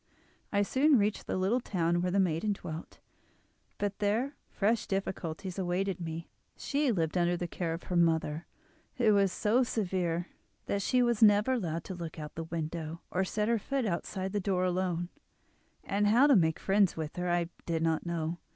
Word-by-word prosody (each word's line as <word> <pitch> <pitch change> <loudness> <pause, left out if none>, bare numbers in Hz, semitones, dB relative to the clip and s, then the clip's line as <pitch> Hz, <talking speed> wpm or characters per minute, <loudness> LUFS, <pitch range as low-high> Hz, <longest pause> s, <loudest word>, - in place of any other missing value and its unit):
I 205 0 +3
soon 270 +6 +4
reached 210 -1 0
the - - -1
little 195 +7 +2
town 175 -6 0
where 180 - 0
the 195 +2 +1
maiden 185 +3 +1
dwelt; 160 -4 -8 0.8
but 205 -1 -2
there 230 +8 0
fresh 215 +3 0
difficulties 190 -1 -3
awaited 185 0 -1
me. 165 0 -5 0.3
She 285 -2 0
lived 165 -3 0
under 175 0 +2
the 175 - -3
care 170 0 -3
of 165 +1 -4
her 180 - -4
mother, 165 -2 +1 0.5
who 225 -4 +4
was 200 -2 +3
so 220 +7 +2
severe 180 -7 -1 0.4
that 200 - -1
she 250 +5 +3
was 235 -2 +1
never 210 +3 +6
allowed 170 -9 -2
to 190 - -6
look 170 -3 -7
out 150 -1 -6
of - - -44
the 165 - -3
window, 160 0 -4
or 185 - +1
set 210 +3 -1
her 230 -1 +2
foot 270 +3 -1
outside 190 0 -2
the 205 - +1
door 185 -2 0
alone, 180 -1 -1 0.7
and 205 +1 +1
how 235 +7 +6
to 285 -2 +6
make 160 -5 +3
friends 195 -2 +2
with 155 -1 -4
her 180 0 -1
I 175 -1 +1 0.2
did 165 -1 0
not 160 -1 +1
know. 170 0 -3
185 Hz, 190 wpm, -31 LUFS, 170-210 Hz, 0.8 s, never